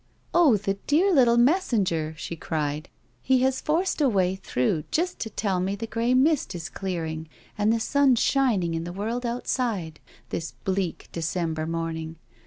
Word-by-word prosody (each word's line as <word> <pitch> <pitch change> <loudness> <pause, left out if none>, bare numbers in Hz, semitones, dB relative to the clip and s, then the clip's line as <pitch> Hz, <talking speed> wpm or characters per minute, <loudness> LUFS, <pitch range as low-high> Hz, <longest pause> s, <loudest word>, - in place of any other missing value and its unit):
Oh, 310 -10 +5
the 195 0 -2
dear 360 +7 +4
little 240 -5 +5
messenger 235 - +2
1" - - -18
she 170 - -6
cried. 155 -1 -3 0.3
"He 260 -1 +3
has 265 0 +1
forced 330 +2 0
a 280 - +4
way 190 -4 +1
through 150 -4 -1
just 350 +3 -1
to 220 - -3
tell 195 -4 -1
me 190 +2 -1
the 220 +3 -5
grey 230 +2 0
mist 280 - +2
is 170 0 -5
clearing 160 -5 -4 0.3
and 210 0 +2
the 230 - +2
sun 280 +2 +3
shining 225 -10 +2
in 165 0 -2
the 175 +1 -6
world 230 +5 -2
outside, 230 -9 -2 0.3
this 165 - -4
bleak, 190 -2 -2
December 160 -1 -2
morning. 165 -1 -3
200 Hz, 170 wpm, -26 LUFS, 165-255 Hz, 0.3 s, Oh